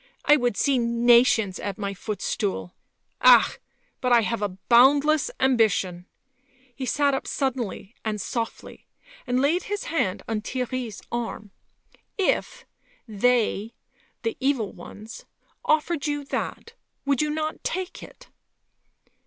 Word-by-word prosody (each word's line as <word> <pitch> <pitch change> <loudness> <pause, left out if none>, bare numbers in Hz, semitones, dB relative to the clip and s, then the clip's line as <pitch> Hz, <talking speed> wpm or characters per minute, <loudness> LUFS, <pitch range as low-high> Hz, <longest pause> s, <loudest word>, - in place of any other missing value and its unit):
I 295 - +7
would 245 -7 0
see 275 -3 +2
nations 235 -3 +3
at 200 -2 -4
my 200 -1 -3
footstool... 200 - -3 0.5
ah!... - - +6 0.4
but 250 - 0
I 240 -1 +6
have 230 0 -2
a 195 -3 -3
boundless 280 - +5
ambition. 205 -8 +1 0.3
..." - - -41 0.3
He 260 0 -5
sat 285 +1 +2
up 270 - -2
suddenly 245 -6 -3
and 215 -1 -2
softly, 225 +3 -5 0.4
and 250 0 +1
laid 305 +7 +1
his 410 -1 -2
hand 260 - -1
on 220 -2 -2
Theirry's 250 -2 -4
arm. 225 -3 -4 0.4
" - - -33 0.2
If... - - -10 0.4
they... 225 0 +1 0.5
the 455 - -1
evil 265 -6 0
ones... 215 +2 -11 0.4
offered 310 0 +1
you 290 -1 -2
that, 460 +10 -4 0.3
would 280 -2 +2
you 300 - 0
not 310 +1 -3
take 370 +1 -4
it - - -13
245 Hz, 130 wpm, -25 LUFS, 215-280 Hz, 0.5 s, I